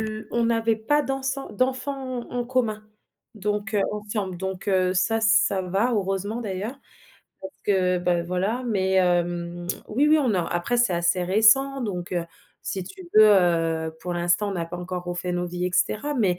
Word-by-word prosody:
l 215 0 -5
on 235 0 +1
n'avait 225 -1 +2
pas 290 +7 +1
dansant 270 +1 -3
d'enfants 260 +1 -2
en 245 - -4
en - - -2
commun 235 -4 -1 0.5
donc, 210 +2 -2
heu, 205 - +3
ensemble, 205 -3 -4
donc, 190 +1 -5
heu, 185 -1 +2
ça 205 +5 +1
ça 220 -3 +3
va, 195 +7 0
heureusement 200 +3 -2
d'ailleurs, 205 +5 -4 0.7
parce 190 0 -8
que 185 -2 +2
ben, 175 -1 +1
voilà. 195 +8 -1
Mais, 190 -4 0
hem, 175 -1 0 0.2
oui, 270 +8 +2
oui, 310 0 +5
on 250 -8 +1
a 180 - +1
après 175 +10 -1
c'est 240 -6 +3
assez 170 +1 +1
récent 245 +8 +4
donc, 180 -6 -4
heu, 175 -1 -1 0.4
si 190 -2 -4
tu 380 - -11
veux, 215 - +9
heu, 165 -5 +3
pour 175 +1 -4
l'instant 175 +4 +1
on - - -3
n'a 170 -3 -3
pas 175 - -6
encore 180 0 -5
refait 175 0 -3
nos 175 0 -1
vies 175 +1 -4
et 180 - 0
cetera 290 +10 0
mais, 195 -9 +1
195 Hz, 185 wpm, -24 LUFS, 180-230 Hz, 0.7 s, veux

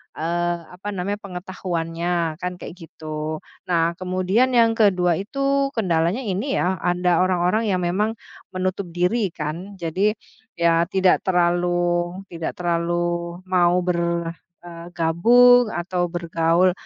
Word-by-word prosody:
eee, 175 +2 -1
apa 185 +3 -10
namanya, 200 +3 -3
pengetahuannya 175 -3 -3
kan 180 0 -4
kayak 180 0 -10
gitu. 155 0 -6 0.2
Nah, 170 -1 +2
kemudian 185 +8 +1
yang 230 -1 +5
ke-2 185 -6 +2
itu 275 +6 0
kendalanya 180 +3 0
ini 210 +7 -2
ya 185 -1 0
anda 175 -1 +1
orang-orang 185 +4 +1
yang 185 -3 0
memang 210 +6 0 0.4
menutup 185 0 -2
diri 180 +3 0
kan. 170 +6 -5
Jadi 190 +5 0 0.4
ya 170 0 +2
tidak 190 -2 +3
terlalu 175 0 +1
tidak 165 -1 -4
terlalu 175 0 -1
mau 180 -1 +2
ber 170 -1 -1 0.3
eee, 170 0 -10
gabung 240 +9 +5
atau 175 -3 -2
bergaul, 170 +1 +1
180 Hz, 120 wpm, -22 LUFS, 170-190 Hz, 0.4 s, yang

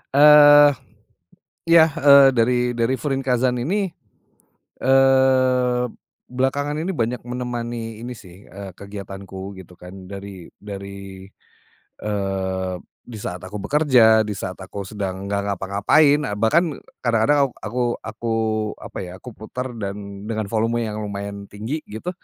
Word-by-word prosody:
Eee. 145 0 +8 0.9
Ya, 165 -1 +6
eee, 140 -2 +7
dari 120 +1 +1
dari 115 +2 +1
Furinkazan 130 -3 0
ini, 190 +12 -1 0.9
eee, 130 -2 +3 0.4
belakangan 135 +3 -1
ini 170 - -3
banyak 120 +1 -1
menemani 120 -2 -5
ini 120 +2 -6
sih, 95 -1 -15
eee, 100 -1 -9
kegiatanku 100 0 -9
gitu 90 0 -15
kan, 90 +1 -12
dari 100 -2 -9
dari, 100 -1 -9 0.7
eee, 95 -2 -2 0.3
di 115 -3 -9
saat 90 - -4
aku 100 +1 -7
bekerja, 120 -7 +4
di 105 - -3
saat 95 -1 -6
aku 95 +2 -7
sedang 100 -1 -5
nggak 100 0 0
ngapa-ngapain, 100 - +2
eee, 105 - -3
bahkan 150 - +2 0.3
kadang-kadang 125 +4 +2
ak - - -24 0.2
aku 125 +2 -1 0.2
aku 110 +1 -6 0.5
apa - - -8
ya, 90 -2 -6
aku 125 - -8
putar 125 +4 -6
dan, 100 0 -6
dengan 110 -2 -3
volume 115 +1 0
yang 105 - -5
lumayan 100 0 -6
tinggi, 110 +11 -6
gitu, 110 +12 -6
115 Hz, 130 wpm, -21 LUFS, 100-130 Hz, 0.9 s, Eee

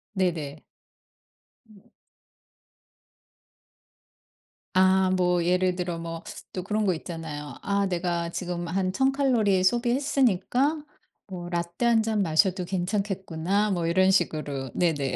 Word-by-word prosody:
네네. 160 -6 -1 1.1
음. 200 -3 -20 2.9
아 190 0 +4
뭐 180 -2 +2
예를 180 0 +2
들어 175 -2 -3
뭐 165 0 -6 0.3
또 185 - -4
그런 210 +1 -1
거 185 - +3
있잖아요. 160 -3 -7
'아 200 0 0
내가 170 -2 -1
지금 175 -1 -4
한 185 +1 0
1,000 265 +6 +2
칼로리 225 -9 +2
소비했으니까 250 - +1 0.4
뭐 175 -2 -7
라떼 170 +6 -2
1 230 -2 +4
잔 220 -2 0
마셔도 180 +2 +2
괜찮겠구나.' 195 +1 -1
뭐 170 -3 0
이런 185 +2 +4
식으로. 150 -7 -1
네네. 145 -6 0
185 Hz, 210 characters per minute, -26 LUFS, 170-200 Hz, 2.9 s, 아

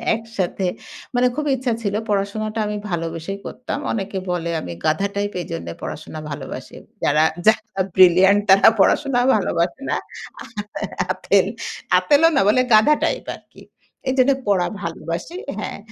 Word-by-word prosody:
একসাথে 210 -5 -3 0.5
মানে 250 +1 +3
খুবই 300 0 -1
ইচ্ছা 255 -1 -1
ছিল 200 -1 -1 0.2
পড়াশোনাটা 215 +2 -1
আমি 210 0 -3
ভালোবেসেই 165 +3 -3
করতাম। 255 +2 -5
অনেকে 195 -2 -3
বলে 170 -1 -2
আমি 85 - -6
গাধ 155 +3 +2
টাইপ 205 0 -2
এজন্যে 85 - -6
পড়াশোনা 155 0 -6
ভালোবাসি। 140 -1 -7 0.3
যারা 155 +2 +4 0.2
যারা 215 -2 +2 0.2
ব্রিলিয়ান্ট 190 +3 +6
তারা 195 +1 +8
পড়াশোনা 265 +3 +3
ভালোবাসে 185 +3 0
না। - - +1 1.1
আ - - -2
আতেল, - - +2 0.5
আঁতেলও 300 +3 +5
না - - +5
বলে 255 +4 +4
গাধ 215 - +6 0.2
টাইপ - - -1
আরকি। - - -18 0.5
এইজন্য 260 +1 +3 0.2
পড়া 185 -3 +2 0.2
ভালোবাসি 170 - -5 0.2
হ্যাঁ। 215 - -5
200 Hz, 135 wpm, -21 LUFS, 170-230 Hz, 1.1 s, তারা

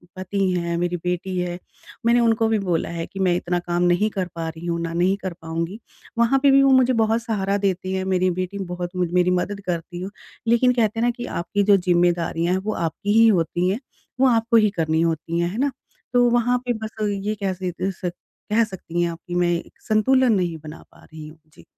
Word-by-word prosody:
पति 185 +2 -4
हैं, 170 -1 -1
मेरी 175 0 -1
बेटी 180 +2 -3
है। 175 0 -3 0.5
मैंने 235 +1 +4
उनको 225 -1 +3
भी 220 -1 +1
बोला 180 -5 -1
है 170 -1 -4
कि 195 - -9
मैं 185 -2 +2
इतना 175 0 -1
काम 175 0 -1
नहीं 175 +4 +3
कर 190 -3 -3
पा 165 -1 -3
रही 160 +1 -9
हूँ। 170 -1 -1
ना 165 0 -3
नहीं 180 +3 +2
कर 185 -2 -4
पाऊँगी। 165 +5 -4 0.4
वहाँ 235 +3 +3
पे 280 - +6
भी 275 0 +6
मुझे 260 -2 +5
बहुत 225 0 +2
सहारा 200 -3 -1
देती 190 -1 -1
हैं 190 - -1
मेरी 185 -1 +2
बेटी 190 +2 -5
बहुत 175 +1 -5
मु 180 -1 +1
मेरी 180 0 +3
मदद 190 +3 -1
करती 175 0 -4
है। 190 - -4 0.4
लेकिन 245 +2 +4
कहते 225 -2 +1
हैं 235 - +2
ना 245 - +3
कि 240 - -5
आपकी 200 +4 0
जो 200 0 +5
ज़िम्मेदारियाँ 175 -1 +1
हैं 190 - 0
वो 215 - -1
आपकी 170 +5 -2
ही 230 - +7
होती 180 -2 +2
हैं 200 +5 -1 0.4
वो 265 - +5
आपको 230 0 +3
ही 215 -1 +4
करनी 160 0 +1
होती 165 0 -1
है, 170 0 +1
है 205 - -6
ना? 280 +3 +1 0.4
तो 245 0 +5
वहाँ 240 +1 +2
पे 245 - +2
बस 220 - -6 0.2
ये 205 +2 -2
कह 190 - 0
स 180 -2 -2 0.3
सक 180 -1 -2 0.4
कह 230 +2 +4
सकती 180 -5 -4
हैं 170 - +1
आप 165 - -9
कि 175 - -4
मैं 175 -1 +2
एक 170 - -6
संतुलन 250 +3 +3
नहीं 175 -4 0
बना 155 +1 -10
पा - - -20
रही 155 -1 -10
हूँ। 155 +1 -14
जी। - - -17
185 Hz, 230 wpm, -22 LUFS, 175-220 Hz, 0.5 s, ही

